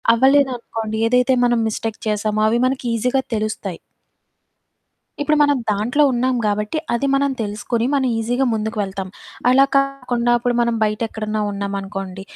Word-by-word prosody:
అవ్వలేదనుకోండి, 245 Hz, -4 st, +1 dB
ఏదైతే 250 Hz, +2 st, +3 dB
మనం 240 Hz, -1 st, +2 dB
మిస్టేక్ 220 Hz, 0 st, -4 dB
చేసామో, 210 Hz, 0 st, 0 dB
అవి 230 Hz, -, +2 dB
మనకీజీగా 250 Hz, 0 st, 0 dB
తెలుస్తాయి. 210 Hz, -4 st, -3 dB, 1.4 s
ఇప్పుడు 305 Hz, +1 st, +2 dB
మనం 290 Hz, -1 st, +3 dB
దాంట్లో 220 Hz, +8 st, +1 dB
ఉన్నాం 255 Hz, +1 st, +1 dB
గాబట్టి, 210 Hz, +7 st, -1 dB, 0.2 s
అది 255 Hz, +4 st, 0 dB
మనం 280 Hz, 0 st, +2 dB
తెలుసుకుని, 225 Hz, +2 st, -2 dB
మనం 270 Hz, -2 st, +2 dB
ఈజీగా 245 Hz, +4 st, 0 dB
ముందుకు 220 Hz, +1 st, -3 dB
వెళ్తాం. 195 Hz, -1 st, -5 dB, 0.4 s
అలా 265 Hz, +2 st, +6 dB
కాకుండా 250 Hz, -3 st, 0 dB
అప్పుడు 240 Hz, 0 st, -1 dB
మనం 235 Hz, -1 st, +1 dB
బయటెక్కడన్నా 215 Hz, 0 st, -1 dB
ఉన్నామనుకోండి, 195 Hz, -1 st, -5 dB
230 Hz, 125 wpm, -20 LUFS, 210-255 Hz, 1.4 s, అలా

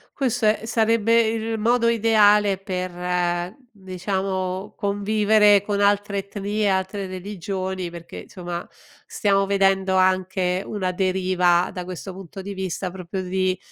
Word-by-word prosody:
Questo 245 Hz, -5 st, 0 dB
e 215 Hz, 0 st, +2 dB
sarebbe 230 Hz, 0 st, +3 dB
il 225 Hz, 0 st, -2 dB
modo 235 Hz, +2 st, +2 dB
ideale 210 Hz, -3 st, +4 dB
per, 180 Hz, -1 st, -2 dB, 0.2 s
diciamo, 190 Hz, 0 st, -3 dB
convivere 205 Hz, 0 st, +3 dB
con 205 Hz, 0 st, -2 dB
altre 205 Hz, 0 st, +2 dB
etnie, 205 Hz, +1 st, -2 dB
altre 190 Hz, +1 st, -1 dB
religioni, 185 Hz, -1 st, -5 dB
perché 170 Hz, 0 st, -9 dB
somma 175 Hz, -2 st, -6 dB, 0.4 s
stiamo 195 Hz, -2 st, +1 dB
vedendo 195 Hz, -1 st, +2 dB
anche 185 Hz, 0 st, +1 dB
una 190 Hz, -3 st, -2 dB
deriva 185 Hz, -1 st, +2 dB
da 180 Hz, -, -5 dB
questo 185 Hz, +1 st, -7 dB
punto 190 Hz, 0 st, -9 dB
di 200 Hz, +1 st, -6 dB
vista 190 Hz, 0 st, -3 dB
proprio 185 Hz, +1 st, -6 dB
di 185 Hz, 0 st, -1 dB
195 Hz, 125 wpm, -23 LUFS, 185-205 Hz, 0.4 s, ideale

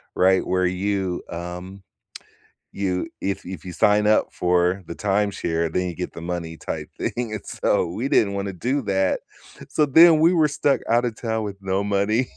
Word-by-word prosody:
right, 95 Hz, 0 st, +3 dB
where 90 Hz, 0 st, +1 dB
you, 95 Hz, 0 st, -2 dB
um, 90 Hz, +3 st, -7 dB, 0.9 s
you 95 Hz, -, -2 dB
if 100 Hz, -2 st, -3 dB
if 90 Hz, -3 st, -7 dB
you 90 Hz, -, -7 dB
sign 105 Hz, +4 st, +3 dB
up 110 Hz, 0 st, +4 dB
for 90 Hz, +2 st, +1 dB
the 85 Hz, -, -6 dB
timeshare, 95 Hz, -5 st, 0 dB
then 90 Hz, +1 st, 0 dB
you 85 Hz, -, -5 dB
get 90 Hz, -, -4 dB
the -, -, -8 dB
money 85 Hz, -1 st, -4 dB
type 75 Hz, -2 st, -5 dB
thing, 120 Hz, -2 st, -3 dB
and 105 Hz, -, -7 dB
so, -, -, 0 dB
we 110 Hz, +10 st, -3 dB
didn't 100 Hz, -7 st, +3 dB
wanna 100 Hz, 0 st, -3 dB
do 130 Hz, +10 st, -1 dB
that. 95 Hz, -3 st, 0 dB, 0.5 s
So 150 Hz, -, +2 dB
then, 160 Hz, +3 st, +7 dB
we 170 Hz, +3 st, +5 dB
were 155 Hz, -3 st, +4 dB
stuck 145 Hz, -1 st, +1 dB
outta 120 Hz, +1 st, +2 dB
town 110 Hz, 0 st, -3 dB
with 100 Hz, -1 st, -5 dB
no 95 Hz, +1 st, -1 dB
money. 105 Hz, +5 st, +1 dB
100 Hz, 180 wpm, -23 LUFS, 90-110 Hz, 0.9 s, then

